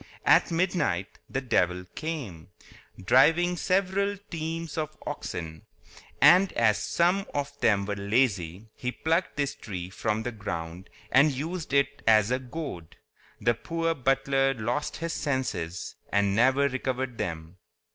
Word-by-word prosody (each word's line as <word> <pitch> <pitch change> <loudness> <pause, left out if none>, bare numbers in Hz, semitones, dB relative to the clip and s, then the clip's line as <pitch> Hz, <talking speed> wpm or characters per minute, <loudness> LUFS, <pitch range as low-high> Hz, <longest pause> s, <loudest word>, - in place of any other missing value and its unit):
At - - +5
midnight 165 - -1
the 135 - -2
devil 90 -7 +1
came, 125 - -5 0.5
driving 165 - +4
several 195 +3 0
teams 165 -1 -4
of 155 -1 -4
oxen; 80 -2 -6 0.5
and 185 +2 +7
as 110 -3 +3
some 180 +3 +1
of 145 0 -2
them 100 -6 +3
were 100 0 -2
lazy, 100 -2 0
he 125 - -4
plucked 165 +6 -1
this 140 -1 0
tree 90 -3 -7
from 110 +3 -1
the 120 - -3
ground 90 -4 -6 0.2
and 140 +4 +5
used 155 +5 -4
it 140 0 +1
as 110 0 +5
a 130 - +1
goad. 130 - -7 0.4
The 120 +3 +2
poor 165 +7 -2
butler 135 0 +1
lost 120 +6 -2
his 165 0 -3
senses, 130 - -3 0.2
and 100 -1 +2
never 130 +5 +4
recovered 130 -2 -3
them. 80 +1 -4
130 Hz, 135 wpm, -27 LUFS, 100-160 Hz, 0.5 s, and